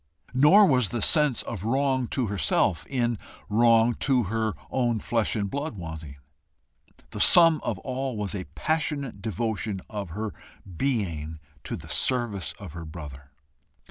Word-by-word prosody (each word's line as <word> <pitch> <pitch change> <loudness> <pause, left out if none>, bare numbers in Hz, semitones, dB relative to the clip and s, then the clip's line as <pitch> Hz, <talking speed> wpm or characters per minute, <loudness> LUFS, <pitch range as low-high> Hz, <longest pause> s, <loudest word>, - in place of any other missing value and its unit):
Nor 150 +11 +7
was 125 - +2
the 120 - -3
sense 150 +2 +3
of 105 -6 -6
wrong 130 +1 +1
to 130 +1 -1
herself 90 - +1
in 120 -4 -1 0.3
wrong 115 +2 +4
to 130 -4 +2
her 110 +1 -2 0.2
own 120 -3 0
flesh 115 +1 0
and 100 -2 -1
blood 140 +3 -4
wanting. 80 -5 -8 1.0
The - - -6
sum 165 -3 +7
of - - -2
all 130 -2 -4
was 105 -1 -3
a 95 -3 -4
passionate 145 -8 -2
devotion 110 -1 -2
of 100 -4 -5
her 105 +4 -5 0.3
being 85 - -3 0.3
to - - -3
the - - -10
service 120 -8 0
of - - -11
her 85 -1 -7
brother. 75 -4 -10
115 Hz, 145 wpm, -26 LUFS, 95-130 Hz, 1.0 s, Nor